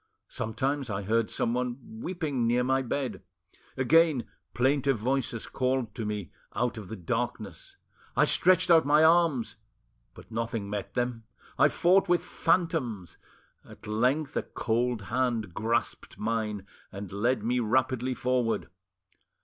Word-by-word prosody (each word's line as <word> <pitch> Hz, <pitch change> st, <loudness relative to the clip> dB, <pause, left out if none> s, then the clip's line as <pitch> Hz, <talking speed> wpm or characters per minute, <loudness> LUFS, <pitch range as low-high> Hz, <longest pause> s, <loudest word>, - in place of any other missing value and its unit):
Sometimes 135 Hz, +3 st, -2 dB
I 100 Hz, -1 st, -3 dB
heard 115 Hz, +2 st, +1 dB
someone 125 Hz, -, -3 dB
weeping 155 Hz, -, -2 dB
near 120 Hz, +1 st, +2 dB
my 130 Hz, +1 st, +2 dB
bed; 125 Hz, -5 st, -3 dB, 0.6 s
again 150 Hz, 0 st, +4 dB, 0.3 s
plaintive 135 Hz, +1 st, +2 dB
voices 120 Hz, 0 st, -1 dB
called 130 Hz, -4 st, -1 dB
to 110 Hz, -, -4 dB
me 105 Hz, -4 st, -4 dB, 0.2 s
out 120 Hz, -1 st, 0 dB
of 105 Hz, -, -9 dB
the 110 Hz, -, -6 dB
darkness. 90 Hz, -5 st, -4 dB, 0.4 s
I -, -, +5 dB
stretched 185 Hz, 0 st, +4 dB
out 165 Hz, -1 st, +7 dB
my 150 Hz, +2 st, +4 dB
arms, 160 Hz, -9 st, +3 dB, 0.6 s
but -, -, -14 dB
nothing 115 Hz, -2 st, -3 dB
met 105 Hz, -2 st, -5 dB
them, 120 Hz, -2 st, -2 dB, 0.3 s
I -, -, +7 dB
fought 185 Hz, +2 st, +3 dB
with 175 Hz, -1 st, +3 dB
phantoms; 130 Hz, -, -1 dB, 0.4 s
at -, -, -15 dB
length 130 Hz, +8 st, 0 dB
a -, -, +1 dB
cold 120 Hz, -1 st, -1 dB
hand 115 Hz, -2 st, -1 dB
grasped 115 Hz, +2 st, -2 dB
mine 105 Hz, -3 st, -2 dB, 0.3 s
and 100 Hz, -1 st, -7 dB
led 110 Hz, +3 st, 0 dB
me 125 Hz, +2 st, +1 dB
rapidly 130 Hz, +2 st, +1 dB
forward. 125 Hz, -6 st, 0 dB
125 Hz, 135 wpm, -28 LUFS, 110-135 Hz, 0.6 s, out